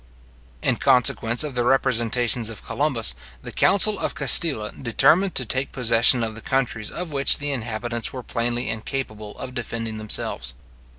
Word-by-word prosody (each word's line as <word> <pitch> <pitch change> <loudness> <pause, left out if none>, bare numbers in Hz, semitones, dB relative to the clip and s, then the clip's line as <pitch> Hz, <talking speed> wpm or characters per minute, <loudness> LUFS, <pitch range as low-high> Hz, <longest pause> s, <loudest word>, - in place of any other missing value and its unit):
In - - +1
consequence 120 0 +2
of 150 -3 -5
the 120 -1 -1
representations 120 -2 0
of 110 - -11
Columbus, 130 - +2 0.3
the - - -6
council 205 +1 +3
of - - -3
Castile 140 -5 +3
determined 140 - +2
to 125 - +3
take 130 +4 -2
possession 120 0 +4
of 110 -1 -4
the 115 - -8
countries 120 -4 -2
of 175 -2 -6
which 140 -1 +3
the 145 0 -3
inhabitants 120 -1 -4
were 130 -1 -8
plainly 120 +1 -2
incapable 110 -2 -6
of 125 - -8
defending 115 -2 -5
themselves. 65 - -1
120 Hz, 155 wpm, -22 LUFS, 115-135 Hz, 0.3 s, possession